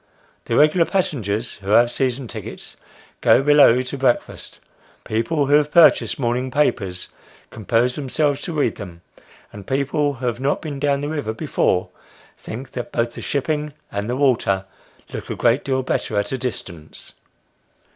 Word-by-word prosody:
The - - -1
regular 155 +3 +4
passengers, 120 - -1
who 95 - -7
have 120 +3 +5
season 130 0 -1
tickets, - - -8 0.5
go 135 - +5
below 140 -4 +6
to 130 +2 -6
breakfast; 130 -2 -1 0.5
people 140 +7 0
who 140 - +1
have 150 0 +4
purchased 170 0 +5
morning 125 0 -1
papers, 100 -10 -1 0.4
compose 115 +3 0
themselves 145 +1 -1
to 170 - -5
read - - 0
them; 90 -5 -10 0.5
and 100 -2 -10
people 140 +2 0
who 130 0 -6
have 120 -1 -1
not 135 +2 0
been 145 -3 -6
down 140 -1 +1
the 145 - -3
river 145 -8 -3
before, 90 -4 0 0.5
think 125 +4 -8
that 120 - -6
both 120 0 -1
the - - -8
shipping 150 +1 -2 0.2
and 100 +2 -3
the 125 - -1
water, 115 -8 +1 0.5
look - - -6
a - - -3
great 120 +4 +2
deal 130 -1 -1
better 110 -4 -2
at 100 0 -1
a 135 - -1
distance. 90 -10 -7
130 Hz, 160 wpm, -21 LUFS, 115-145 Hz, 0.5 s, below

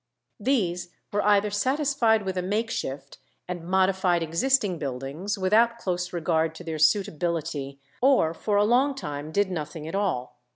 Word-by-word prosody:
These 195 -8 0 0.2
were 205 - +2
either 205 0 +3
satisfied 255 -1 +2
with 190 -1 -3
a 180 - 0
makeshift, 180 -10 -3 0.3
and 175 -2 -5
modified 185 -1 +2
existing 190 +2 +1
buildings, 140 +9 -4
without 220 +5 +3
close 180 -5 -2
regard 160 -2 0
to 175 - -9
their 160 -2 -4
suitability, 155 -4 0 0.2
or 250 -12 +4
for 205 +4 -1
a 205 - +4
long 260 +5 +3
time 150 - -6
did 200 +1 +1
nothing 155 -2 -5
at 160 - -6
all. 190 -11 -2
185 Hz, 150 wpm, -26 LUFS, 160-210 Hz, 0.3 s, or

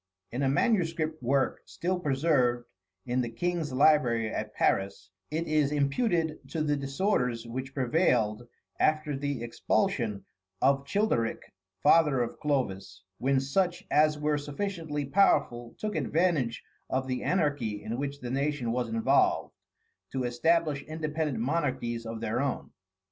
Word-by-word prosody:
In 125 - -3
a 135 - +2
manuscript 165 - +1
work, 135 +2 +1
still 180 +1 -2
preserved 135 -5 +1 0.4
in 125 +1 0
the 120 - -2
King's 170 +3 -2
library 130 -5 +3
at - - -3
Paris, 95 -1 0 0.2
it 160 +2 -2
is 150 -2 +2
imputed 155 - +1
to 160 -2 -1
the 145 -1 +1
disorders 135 - 0
which 130 +3 -6
prevailed 120 -5 +1 0.3
after 155 -1 +2
the 140 -3 -3
expulsion 115 - -1 0.3
of 140 +1 +2
Childeric, 200 - 0 0.3
father 150 -4 +5
of 120 - -6
Clovis, 100 -10 -2 0.2
when 135 +1 +2
such 175 +6 0
as 150 0 +4
were 150 0 0
sufficiently 150 -1 -3
powerful 120 -8 +2
took 215 -1 -3
advantage 160 -8 0 0.3
of 130 0 0
the 130 -1 -2
anarchy 145 - 0
in 115 +3 -4
which 140 0 -4
the 120 -1 -5
nation 140 -3 -1
was 120 -1 -1
involved, 115 0 +2 0.6
to 130 -1 -1
establish 150 +4 +1
independent 155 -3 -3
monarchies 125 -3 -1
of 115 0 -5
their 115 +2 -1
own. 140 -2 -3
140 Hz, 135 wpm, -29 LUFS, 120-155 Hz, 0.6 s, father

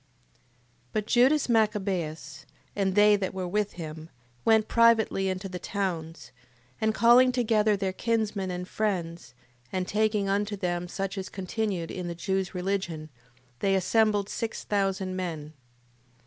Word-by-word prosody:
8:1. 135 - -38 0.9
But 215 -1 -1
Judas 260 +6 +4
Machabeus, 185 -10 -1 0.3
and 190 -2 0
they 210 0 +6
that 190 -1 -3
were 185 -1 -3
with 205 +2 -1
him, 160 -1 -8 0.3
went 220 -1 +4
privately 225 -4 +3
into 185 +1 -3
the 180 -1 -6
towns: 170 -5 -4 0.5
and 220 0 +3
calling 240 +3 +6
together 220 -4 +2
their 190 -1 -2
kinsmen 215 -3 -1
and 180 0 -4
friends, 175 - -3 0.4
and 185 -1 -2
taking 210 -1 +1
unto 205 +1 0
them 175 -2 -2
such 195 +2 -4
as 190 +1 -6
continued 190 -3 -3
in 180 -1 -5
the 170 - -4
Jews' 190 +2 -2
religion, 180 -5 -3 0.5
they 195 -1 +2
assembled 205 +1 +2
six 225 +1 -4
thousand 195 -2 -1
men. 160 -5 -5
195 Hz, 140 wpm, -27 LUFS, 180-215 Hz, 0.9 s, they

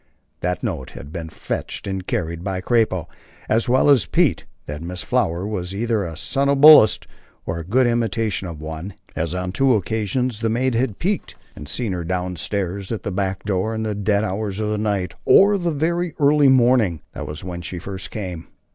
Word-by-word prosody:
That 90 0 -2
notes 65 0 -4
had 70 +3 -10
been 80 -1 -5
fetched - - -5
and 95 -2 -4
carried 85 0 -2
by 95 -1 -2
"Crappo" 100 -5 +1 0.4
as 115 +3 +1
well 130 +3 +4
as 140 -8 +5
Pete; - - +2 0.2
that 75 +1 -6
Miss 90 +1 -5
Flower 85 +3 0
was 95 -3 -4
either 115 -1 0
a 80 -3 -6
somnambulist 140 -3 +6 0.4
or 80 +1 -3
a - - -5
good 125 +10 +2
imitation 115 -4 0
of 80 -3 -7
one, 80 +5 -6 0.2
as 85 +2 -2
on 90 0 -2
two 135 +4 +3
occasions 110 +4 -1
the 115 0 0
maid 125 +3 +1
had 115 -3 0
"peeked" 195 +3 -2 0.2
and 75 - -9
seen 115 0 -2
her 90 -1 -3
down 90 +1 -2
stairs 95 +5 -3
at 115 - -3
the 100 - -3
back 95 0 -2
door 105 +2 -1
in 110 - -2
the 110 -1 -1
dead 100 0 +1
hours 100 0 -3
of 105 -1 -1
the 105 - -1
night, 100 -4 -1
or 205 +1 +6
the 175 -1 0
very 170 +2 -1
early 145 -2 +5
morning. 120 - +4
That - - -6
was 75 +1 -7
when 90 -1 -5
she 90 - -6
first 95 +2 -6
came. 90 -6 -6
100 Hz, 195 wpm, -21 LUFS, 90-120 Hz, 0.4 s, somnambulist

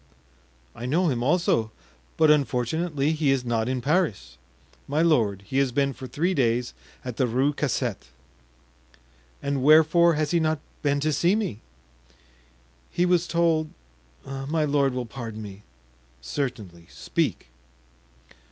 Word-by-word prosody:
"I 120 - -6
know 170 +6 +2
him 120 -4 -1
also, 125 -6 +1 0.5
but 155 -1 +5
unfortunately 145 +2 0
he 155 -3 0
is 135 -2 +1
not 115 0 0
in 130 -1 -2
Paris." 120 - -1 0.5
"My 150 +4 +1
lord, 110 - +2
he 130 +7 -1
has 135 -2 +1
been 140 +1 0
for 130 - -9
three 170 +8 -1
days 120 -4 0 0.3
at 125 -3 -5
the 130 - +2
Rue 130 +5 +1
Cassette." 125 - -2 1.4
"And 140 -1 -1
wherefore 160 +3 +5
has 150 -1 -1
he 170 - +3
not 155 -1 +1 0.2
been 145 -1 +1
to 155 +1 +1
see 175 +7 +2
me?" 190 - -3 1.3
"He 175 - 0
was 180 -1 +2
told—my 135 - -2
lord 140 -3 +1
will 125 -1 -2
pardon 115 -2 -7
me——" 100 -1 -10 0.6
"Certainly, 95 - -5
speak." - - -2
135 Hz, 135 wpm, -25 LUFS, 120-155 Hz, 1.4 s, but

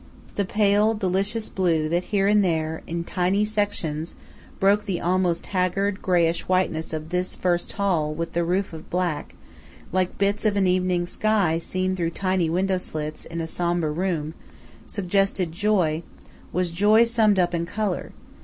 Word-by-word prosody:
The 200 - -1
pale, 210 +2 +3
delicious 200 +3 0
blue 165 -5 +1
that 175 +2 0
here 200 -2 +1
and 205 0 +4
there, 160 -3 -1
in 170 0 -3
tiny 185 +4 +1
sections, 205 -7 -2 0.4
broke 205 +2 +3
the 190 -4 -2
almost 180 -1 +1
haggard, 195 +1 0
greyish 170 -2 +1
whiteness 185 -3 0
of 155 0 -5
this 180 +1 -2
first 175 -1 -1
hall 180 -7 0
with 165 +2 -4
the 170 - +1
roof 180 +2 -1
of 160 -1 -10
black, 175 -4 -2 0.6
like 185 0 0
bits 200 +1 +1
of 210 -2 +2
an 195 - +3
evening 180 -1 +1
sky 195 -4 +1
seen 185 +2 -2
through 170 -2 -1
tiny 185 -1 0
window 185 +2 +1
slits 155 -3 -5
in 165 0 -5
a - - -2
sombre 170 -1 0
room, 160 -2 -2 0.5
suggested 195 -2 0
joy, 175 -4 +1 0.5
was 180 -1 0
joy 210 +6 +5
summed 225 -3 +3
up 175 -1 +2
in 170 0 -1
color. 205 0 -2
185 Hz, 160 wpm, -24 LUFS, 170-200 Hz, 0.6 s, joy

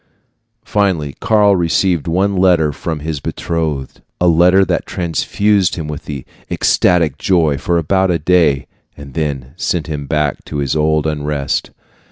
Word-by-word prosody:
Finally 90 -9 0
Karl 105 -2 +3
received 85 -1 +1
one 95 +4 +1
letter 90 -5 +3
from 75 +1 -5
his 80 -1 -3
betrothed 80 -3 -3 0.2
a 90 - +2
letter 90 +3 +5
that - - -2
transfused 95 +2 0
him 80 -3 -5
with 75 +1 -7 0.4
ecstatic 85 -6 +2
joy 80 -6 +2
for 85 +5 -1
about 95 +4 +1
a 85 - +2
day, 80 -4 +2 0.3
and 70 -2 -11
then 70 -4 -3
sent 85 -3 -1
him 75 -3 -5
back 75 -2 -1
to 75 - -6
his 70 +1 -1
old 75 0 +1
unrest. 75 -2 -2
80 Hz, 145 wpm, -16 LUFS, 75-90 Hz, 0.4 s, letter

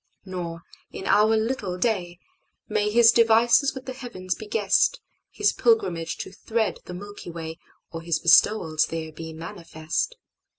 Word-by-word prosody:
Nor, 170 -3 -6 0.3
in 190 - -7
our 215 +2 +4
little 220 -5 -2
day, 180 -5 -1 0.5
May 210 0 0
His 230 +1 +6
devices 235 +4 +4
with 265 0 -8
the 260 - -5
heavens 235 -8 -5
be 215 - -10
guessed, 210 - +2 0.3
His - - +1
pilgrimage 405 - +1
to - - -8
thread 220 -2 -2
the 180 - -7
Milky 205 0 -9
WayOr 165 0 -9
His 165 -1 0
bestowals 165 -2 +4
there 160 -1 -5
be 160 +1 -8
manifest. 165 - -4
190 Hz, 140 wpm, -25 LUFS, 165-225 Hz, 0.5 s, His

